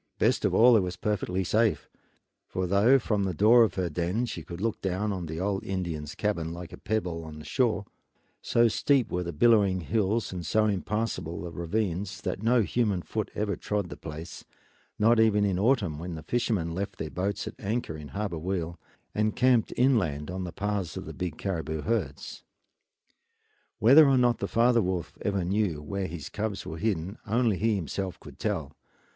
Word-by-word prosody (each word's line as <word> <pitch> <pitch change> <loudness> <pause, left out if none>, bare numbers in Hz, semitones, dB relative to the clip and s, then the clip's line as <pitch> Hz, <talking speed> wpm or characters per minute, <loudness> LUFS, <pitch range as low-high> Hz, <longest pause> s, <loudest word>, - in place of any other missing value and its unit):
Best - - +2
of - - +1
all 120 +1 +7
it - - +6
was 90 -2 -2
perfectly 95 -2 -1
safe; 110 +4 +1 0.6
for 95 - -2
though 100 +8 +5
from 105 -5 0
the 95 -3 -2
door 110 +7 +6
of 110 - 0
her 90 -2 0
den 90 +8 -1
she 105 -8 -5
could 85 +2 -8
look 110 +1 -2
down 100 +2 -1
on 90 -3 -4
the 80 +1 -5
old 95 +1 -1
Indian's 85 -6 -4
cabin, 85 -6 -1
like 85 0 -8
a - - -8
pebble 90 -6 -2
on 80 -1 -9
the 75 - -10
shore, 115 -6 +1 0.6
so 120 0 +3
steep 130 +2 +2
were 90 - 0
the 85 -1 -4
billowing 100 0 +4
hills 105 +3 0
and 90 -1 -4
so 110 +7 +2
impassable 100 -4 -2
the 85 0 -6
ravines 95 +2 -2
that - - -3
no 115 +1 +3
human 105 -5 0
foot 110 -2 -3
ever 105 -1 -1
trod 105 -4 -2
the - - -7
place, 80 +2 -8 0.5
not 115 +2 +4
even 105 -2 +4
in 95 -2 0
autumn 100 - +2
when 85 0 -5
the 80 - -8
fishermen 105 -9 -1
left 100 +3 -4
their 80 - -5
boats 95 +2 -2
at - - -5
anchor 110 -5 -2
in 75 -1 -8
Harbor 85 +3 -3
Weal 85 -1 -3 0.3
and 105 0 0
camped 125 -3 +3
inland 90 - +2
on 95 0 -4
the 90 - -5
paths 100 -2 -3
of - - -6
the - - -7
big 90 -4 -4
caribou 80 -5 -3
herds. 100 -12 -3 1.3
Whether 140 +7 +7
or 135 - +4
not 120 -2 +3
the 100 - -2
father 120 +2 +3
wolf 90 -3 -3
ever 100 -3 0
knew 95 -4 0
where 95 +6 -3
his 80 -3 -7
cubs 105 -2 -3
were 80 - -6
hidden 100 -1 -2
only 115 -2 +2
he 110 0 +2
himself 95 +1 -4
could - - -13
tell. - - -2
100 Hz, 190 wpm, -28 LUFS, 85-110 Hz, 1.3 s, all